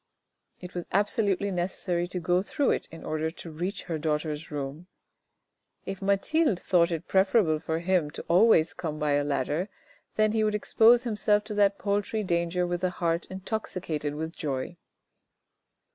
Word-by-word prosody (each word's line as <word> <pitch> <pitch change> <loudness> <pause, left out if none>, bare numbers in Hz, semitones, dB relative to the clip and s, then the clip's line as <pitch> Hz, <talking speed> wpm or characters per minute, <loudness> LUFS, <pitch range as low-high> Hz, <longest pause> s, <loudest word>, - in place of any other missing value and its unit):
It 180 0 -9
was 175 -1 -5
absolutely 200 0 +1
necessary 175 -1 -1
to 180 0 -4
go 175 +2 +2
through 275 +7 0
it - - -1
in 165 - -11
order 155 +1 -1
to 165 0 -10
reach 180 +6 -4
her 160 -2 -3
daughter's 150 0 -2
room. 145 +3 -5 1.0
If 195 0 -5
Mathilde 200 - +2
thought 175 -3 +3
it 165 -3 -4
preferable 190 -4 +3
for 160 0 -2
him 170 -2 +1 0.2
always 175 -2 +5
to - - -17
come 155 -3 -4
by 150 -1 0
a 145 0 +2
ladder, 145 +6 -1 0.5
then 215 0 +3
he 220 0 +1
would 210 0 +1
expose 230 +3 +5
himself 210 -2 +1
to 215 0 -5
that 200 -1 +3
paltry 205 +1 -1
danger 175 -1 0
with 175 0 -3
a 185 - +3
heart 170 -1 -1
intoxicated 185 -6 -4
with 160 +2 -5
joy. 140 +3 -3
180 Hz, 160 wpm, -27 LUFS, 160-200 Hz, 1.0 s, always